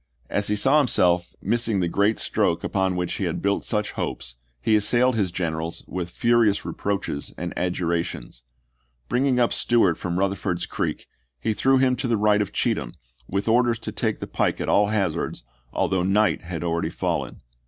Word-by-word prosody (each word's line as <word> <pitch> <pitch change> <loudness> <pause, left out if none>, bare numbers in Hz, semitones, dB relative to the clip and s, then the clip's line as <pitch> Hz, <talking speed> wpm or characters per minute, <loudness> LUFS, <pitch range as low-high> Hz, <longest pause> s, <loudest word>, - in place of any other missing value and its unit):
As 105 - 0
he 105 - +1
saw 135 +8 +4
himself 90 -10 +2
missing 115 -4 +1
the 90 - +1
great 100 +5 +2
stroke - - 0
upon 95 -1 0
which 90 -1 -2
he - - -2
had - - -2
built 100 0 0
such 105 -2 -1
hopes, 60 -2 -4 0.2
he 110 - +2
assailed 120 +4 +3
his 100 -4 +1
generals 85 -2 -3
with 90 -1 -4
furious 115 0 +2
reproaches 100 -8 -3
and 90 +1 -4
adjurations. 85 -7 -2 0.7
Bringing 130 0 +2
up 120 - +3
Stewart 105 -9 +3
from 85 -1 -3
Euther 100 +1 +1
ford's 90 -4 -2
Creek - - -3 0.3
he 110 - 0
threw 135 +5 +3
him 130 -1 +3
to 135 - -2
the 115 -2 +2
right 105 0 +3
of 105 - -2
Cheatham, - - -1 0.3
with 100 +3 -2
orders 120 0 +3
to 115 - -6
take 110 -3 -1
the - - -5
pike - - -1
at - - -3
all 105 0 +4
hazards, 105 - -1 0.3
although 95 -1 0
night 100 +4 +2
had 85 -2 -5
already 85 -1 -1
fallen. - - -3
100 Hz, 180 wpm, -24 LUFS, 90-115 Hz, 0.7 s, saw